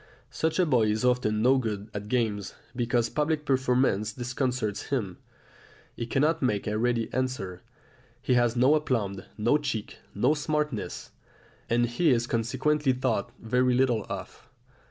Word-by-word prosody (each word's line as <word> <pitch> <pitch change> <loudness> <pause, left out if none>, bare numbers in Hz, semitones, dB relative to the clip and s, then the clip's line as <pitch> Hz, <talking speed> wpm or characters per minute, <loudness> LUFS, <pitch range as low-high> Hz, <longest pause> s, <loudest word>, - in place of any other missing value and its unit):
Such 160 0 -1
a 185 - +4
boy 125 -8 +3
is 110 +4 0
often 110 -4 +2
no 130 +2 +5
good 105 -3 -4
at 105 0 -5
games, 105 -4 -1 0.2
because 120 -1 +1
public 150 +3 -1
performance 125 -6 +1
disconcerts 125 -4 -2
him; 110 -10 -2 0.8
he 115 - -4
cannot 150 +6 +1
make 105 -6 0
a 105 0 -1
ready 115 -1 +1
answer, 125 -8 -2 0.6
he 130 0 0
has 120 -1 +3
no 130 +4 +5
aplomb, 115 -10 0 0.2
no 120 +8 +3
cheek, 120 -8 -4 0.2
no 125 +8 +3
smartness; 150 -5 -2 0.6
and 120 +1 +3
he 120 +8 +1
is 120 -3 +3
consequently 130 +5 +1
thought 125 -1 -1
very 125 +2 +2
little 120 -5 +1
of. - - -7
125 Hz, 145 wpm, -27 LUFS, 110-135 Hz, 0.8 s, no